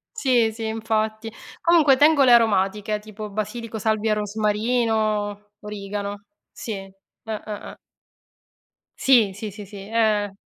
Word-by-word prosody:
Sì, 250 - +2
sì, 220 0 -5
infatti. 220 0 -2 0.3
Comunque 325 -5 +5
tengo 290 +1 +5
le 250 -2 +6
aromatiche, 210 -2 +2
tipo 215 0 -8
basilico, 220 +2 -5
salvia 220 +1 0
e - - +4
rosmarino, 210 -1 -1
origano. 205 0 -6 0.3
Sì, 220 -3 -6 0.5
ah, 220 -1 -4
ah, 210 -2 -7
ah. - - -15 1.2
Sì, 235 -7 +4
sì, 210 +2 -6
sì, 205 +1 -9
sì, 200 +1 -11
eh, 215 -3 +1
215 Hz, 125 wpm, -23 LUFS, 210-230 Hz, 1.2 s, le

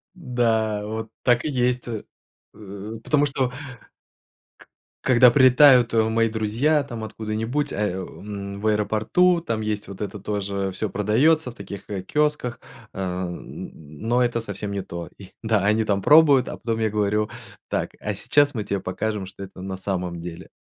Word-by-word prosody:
Да, 115 - 0
вот 110 +1 -5
так 120 -1 +3
и 155 - -1
есть, 125 -2 0
э, 110 -3 -4 0.5
э, 100 0 -9
потому 145 -1 +3
что 135 -3 -1 1.1
К - - -18 0.3
когда 125 -1 +6
прилетают, 130 -2 +6
э, 110 - +4
мои 115 0 +2
друзья 115 +8 +1
там 120 -5 -7
откуда-нибудь, 110 +6 -3
а, - - -5
о, 95 -2 -2
ам, 100 -1 -7
в 110 - 0
аэропорту, 110 - +2
там 115 -9 -2
есть 105 -1 -3
вот 100 -1 -9
это 105 +1 -4
тоже, 100 -1 -2
всё 105 +3 -3
продаётся, 125 - +2
в - - -15
таких, 100 0 -9
э, 100 -3 -4
киосках, 150 -4 0 0.3
э, - - -8
н 90 -1 -5
но 110 +12 -1
это 120 -1 0
совсем 100 -1 -5
не 100 -1 -2
то. 85 -2 -7
И, 95 -2 -13
да, 110 -3 +1
они 110 +2 +3
там 100 -2 0
пробуют, 145 -3 +6
а - - -5
потом 115 -1 -2
я 110 - +1
говорю: 105 0 0 0.4
"Так, - - -1
а - - -3
сейчас 145 0 +2
мы 110 -4 -3
тебе 100 -1 -2
покажем, 100 +2 -3
что 95 +1 -9
это 95 -1 -10
на 95 0 -4
самом 90 -3 -3
деле." 85 +1 -8
110 Hz, 175 wpm, -23 LUFS, 100-125 Hz, 1.1 s, когда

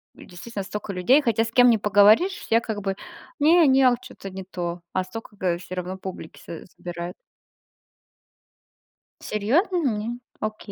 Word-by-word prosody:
действительно 200 +3 -8
столько 205 +1 -6
людей, 245 +11 +4
хотя 225 -3 +1
с 225 - -6
кем 245 +1 +6
не 230 - +5
поговоришь, 210 - +4
я 230 +1 +4
как 215 -3 -4
бы: 195 -1 -2 0.4
"Не, 320 +2 +5
не, 265 0 +5
а 255 - +6
вот 245 0 -2
чё-то 195 - -10
не 190 0 -7
то". 175 -2 -4
А 185 - 0
столько, 210 +3 -9
э, 175 -2 +1
всё 185 - -8
равно 185 +1 -4
публики 185 -4 -8
с 165 - -9
собирает. 175 0 -6 2.1
Серьезно? 280 - 0
М. 240 -5 -1 0.2
Ок. 215 0 -3
210 Hz, 160 wpm, -24 LUFS, 185-245 Hz, 2.1 s, кем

